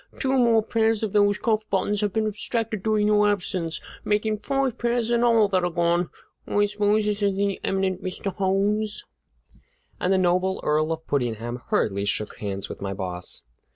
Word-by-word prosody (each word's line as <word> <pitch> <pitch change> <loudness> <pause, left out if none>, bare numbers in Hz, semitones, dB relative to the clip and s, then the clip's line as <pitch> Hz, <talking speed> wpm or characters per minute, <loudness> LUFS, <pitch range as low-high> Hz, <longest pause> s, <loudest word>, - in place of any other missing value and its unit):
Two 265 0 +1
more 230 -3 +4
pairs 225 0 +1
of 215 - -2
those 205 0 +4
cuff 220 -2 0
buttons 200 +1 0
have 205 -1 0
been 220 +1 0
abstracted 215 0 -2
during 215 0 +1
your 210 0 +4
absence, 180 -4 -2 0.2
making 215 +1 0
five 270 +2 -1
pairs 240 -1 0
in 235 0 +3
all 230 -3 +5
that 185 -2 +1
are 175 - +1
gone! 170 0 +1 0.4
I 205 0 +2
suppose 210 +1 +1
this 210 0 -1
is 200 -1 +2
the 200 0 0
eminent 190 -1 -1
Mr. 190 +1 -4
Holmes?" 205 +2 0 0.9
And 180 - 0
the 190 - +4
noble 185 +1 +1
Earl 155 +1 +1
of 160 0 -4
Puddingham 120 -2 -2
hurriedly 100 -1 0
shook 105 +1 -2
hands 100 -2 -4
with - - -9
my 100 0 -3
boss. 90 -7 -4
205 Hz, 180 wpm, -25 LUFS, 175-215 Hz, 0.9 s, all